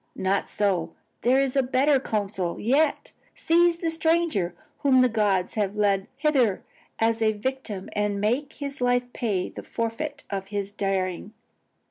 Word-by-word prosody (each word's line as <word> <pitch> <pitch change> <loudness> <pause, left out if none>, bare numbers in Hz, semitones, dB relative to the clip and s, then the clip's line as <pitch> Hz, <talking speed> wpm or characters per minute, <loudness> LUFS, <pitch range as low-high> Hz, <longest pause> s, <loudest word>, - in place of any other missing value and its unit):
Not 190 +1 0
so, 180 -5 0 0.3
there 255 +3 +4
is 275 -1 0
a 270 - +5
better 265 +2 +3
counsel 200 -7 -2
yet; 280 +6 +1 0.2
seize 340 +1 +3
the 335 -1 -1
stranger 320 - +1 0.2
whom 260 -2 +4
the 255 - +4
gods 205 -5 +1
have 205 -2 -1
led 200 -2 +1
hither 270 -9 +2 0.3
as 225 0 +1
a 220 -1 +3
victim 215 -3 -4
and 205 -1 0
make 250 +8 0
his 280 -2 -6
life 245 0 +1
pay 205 -7 -1
the - - -8
forfeit 280 +6 -4
of 195 -1 -3
his 200 -1 -3
daring. 195 -1 -2
225 Hz, 150 wpm, -25 LUFS, 200-275 Hz, 0.3 s, a